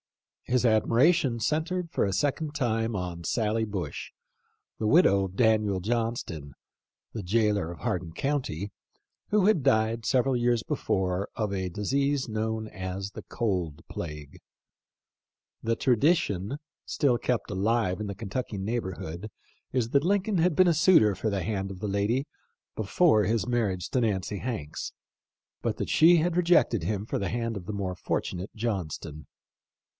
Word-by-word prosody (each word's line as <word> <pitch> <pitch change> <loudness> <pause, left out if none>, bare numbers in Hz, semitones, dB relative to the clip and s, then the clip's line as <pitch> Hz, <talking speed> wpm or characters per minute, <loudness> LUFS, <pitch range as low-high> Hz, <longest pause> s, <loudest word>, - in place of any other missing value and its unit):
His 125 0 +1
admiration 120 +6 +4
had 115 -1 -4
centred 165 +5 -1
for - - +1
a 100 - +1
second 145 - -1
time 115 -3 0
on 90 -3 -4
Sally 110 +4 0
Bush, 95 -8 -5 0.7
the 110 - 0
widow 105 - +5
of 95 0 -8
Daniel 110 -3 +3
Johnston, 105 - -3 0.6
the 110 - -4
jailer 105 -3 +1
of 85 -6 -10
Hardin 85 -2 -2
county, 105 - -2 0.6
who 210 -2 +3
had 205 -7 +4
died 110 -3 +2
several 130 +2 +2
years 120 -1 +2
before 95 -1 -1
of 105 -3 -1
a 95 -1 -2
disease 140 +9 0
known 110 0 -2
as 95 0 -5
the - - -8
" - - -31
cold 90 -10 -1
plague." 75 -3 -7 1.2
The 115 0 +1
tradition 130 - +2 0.3
still 130 -5 +2
kept 125 -3 -1
alive 105 0 +1
in 105 - -3
the 100 - -5
Kentucky 105 +2 -4
neighborhood 95 -3 -4 0.4
is 120 -3 0
that 140 0 +3
Lincoln 200 +1 +1
had 170 -1 +3
been 185 +2 +5
a 170 - +5
suitor 155 - +5
for 110 - -1
the 100 -3 -1
hand 95 0 -2
of 95 - -8
the 105 - -3
lady 105 +7 0 0.5
before 110 - +3
his 110 0 0
marriage 105 -8 0
to 130 - +2
Nancy 100 -2 -1
Hanks, 110 - -4 0.7
but - - -1
that - - -3
she 170 +2 +6
had 170 +1 +1
rejected 170 - +3
him 100 +3 -2
for - - -2
the 100 - -2
hand 115 -1 -2
of 95 -2 -7
the 105 - -3
more 95 -3 -3
fortu - - -2
nate 90 +3 -6
Johnston. 85 -8 -4
110 Hz, 160 wpm, -28 LUFS, 95-125 Hz, 1.2 s, she